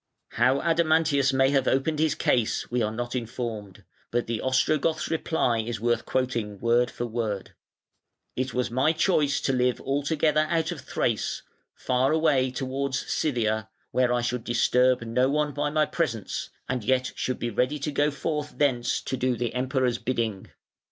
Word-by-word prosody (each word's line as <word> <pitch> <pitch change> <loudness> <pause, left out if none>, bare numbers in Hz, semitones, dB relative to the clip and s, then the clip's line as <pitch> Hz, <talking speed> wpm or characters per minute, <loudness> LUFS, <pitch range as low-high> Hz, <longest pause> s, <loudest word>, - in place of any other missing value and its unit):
How 130 +2 +2
Adamantius 160 -4 +3
may 135 0 +3
have 135 -2 +2
opened 150 +3 +1
his 155 -2 +2
case 120 -1 0
we 125 0 +1
are 105 -1 0
not 120 +2 -4
informed, 115 -5 -5 0.3
but 120 0 0
the 115 -1 -3
Ostrogoth's 155 +4 +1
reply 155 -7 +1
is 110 0 -3
worth 120 +1 0
quoting 120 -6 -1
word 120 +1 +2
for 120 - -4
word: 110 -4 -3 0.8
"It 130 0 -2
was 125 0 -1
my 130 +6 +2
choice 150 -4 +2
to 135 - 0
live 125 -1 +1
altogether 150 +2 +1
out 165 -1 0
of - - -6
Thrace, - - -2 0.3
far 130 +2 +1
away 150 -5 +3
towards 135 +1 -2 0.2
Scythia, 110 -6 0 0.2
where 125 -1 +2
I 120 0 +1
should 120 -1 -2
disturb 125 +1 +2
no 125 +3 +1
one 150 0 0
by 145 +1 -1
my 155 +1 +2
presence, 120 - -3 0.2
and 125 -3 -2
yet 130 +3 +1
should 130 - -2
be 120 - -3
ready 125 +7 0
to 150 +1 -3
go 145 +1 +2
forth 150 +1 -4
thence 125 -5 +1
to - - -3
do 130 0 0
the 120 -1 -2
Emperor's 125 -1 0
bidding. 115 -6 -2
130 Hz, 165 wpm, -26 LUFS, 120-145 Hz, 0.8 s, Adamantius